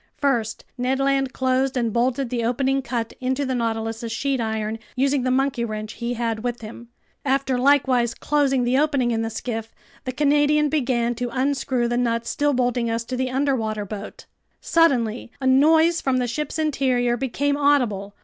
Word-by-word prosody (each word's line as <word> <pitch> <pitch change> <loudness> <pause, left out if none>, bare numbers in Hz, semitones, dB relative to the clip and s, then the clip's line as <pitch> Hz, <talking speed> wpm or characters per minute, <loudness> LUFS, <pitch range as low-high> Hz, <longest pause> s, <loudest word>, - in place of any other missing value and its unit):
First, 235 -6 -1
Ned 255 +2 +1
Land 275 -1 +1
closed 260 +1 0
and 230 -3 0
bolted 250 +1 0
the 240 -2 -1
opening 270 +3 +1
cut 235 -4 -3
into 260 +2 -1
the 260 - -1
Nautilus's 225 -1 -2
sheet 275 +1 -1
iron, 220 0 -2 0.2
using 275 +1 +1
the 255 - 0
monkey 265 -1 +1
wrench 215 -1 -4
he 240 0 -3
had 230 -2 -2
with 240 -1 -3
him. 230 +2 -9 0.4
After 270 -1 +1
likewise 255 -3 +3
closing 275 -3 +1
the 250 +2 +2
opening 280 -5 +1
in 225 -1 0
the 225 - -2
skiff, 225 0 -5 0.3
the 255 - -2
Canadian 295 +2 +3
began 245 -5 0
to 245 +1 -3
unscrew 260 -1 0
the 240 0 -1
nuts 230 -1 0
still 290 0 +1
bolting 245 -2 0
us 230 0 -1
to 255 +2 -5
the 255 0 -1
underwater 250 -6 -1
boat. 205 +1 -8 0.3
Suddenly 245 -9 +1
a 265 - -4
noise 320 +5 +4
from 265 -1 +1
the 250 - +1
ship's 290 +6 -3
interior 260 -6 +1
became 270 +3 -1
audible. 245 -9 +1
255 Hz, 175 wpm, -23 LUFS, 235-275 Hz, 0.4 s, noise